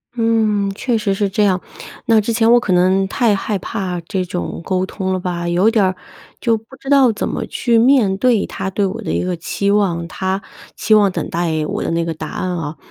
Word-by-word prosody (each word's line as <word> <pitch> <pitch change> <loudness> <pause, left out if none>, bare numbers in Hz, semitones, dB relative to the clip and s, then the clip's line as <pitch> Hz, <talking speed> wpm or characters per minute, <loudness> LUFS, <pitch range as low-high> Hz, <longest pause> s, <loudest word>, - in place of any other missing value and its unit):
嗯， 220 -4 +1
确 235 +2 -1
实 210 -3 0
是 200 0 0
这 200 +2 +1
样。 190 -2 +2 0.5
那 225 -3 +4
之 225 - -2
前 230 0 +3
我 240 - +7
可 205 - -3
能 185 +2 +3
太 215 +1 +2
害 205 +1 -2
怕 180 -1 -4
这 185 +2 -3
种 85 - -5
沟 185 0 0
通 190 -1 -3
了 185 - -1
吧， 175 -1 -3
有 180 +5 +3
点 225 -3 +2
儿 185 0 0 0.5
就 230 -2 +2
不 215 - -15 0.2
知 270 - -8
道 275 -4 +5
怎 210 - -3
么 - - -3
去 235 -2 0
面 230 -5 +4
对 230 -1 +2
他 190 - -4
对 200 +1 0
我 190 - -4
的 - - -4
一 - - 0
个 180 -1 -2
期 200 +4 -2
望， 185 -5 +1
他 190 +2 -2 0.3
期 215 - +1
望 200 -3 +4
等 - - -4
待 165 -2 -1
我 - - -3
的 - - -2
那 165 0 0
个 165 - -2
答 160 - -7
案 185 - -3
哦。 155 -2 -5
195 Hz, 245 characters per minute, -18 LUFS, 180-220 Hz, 0.5 s, 我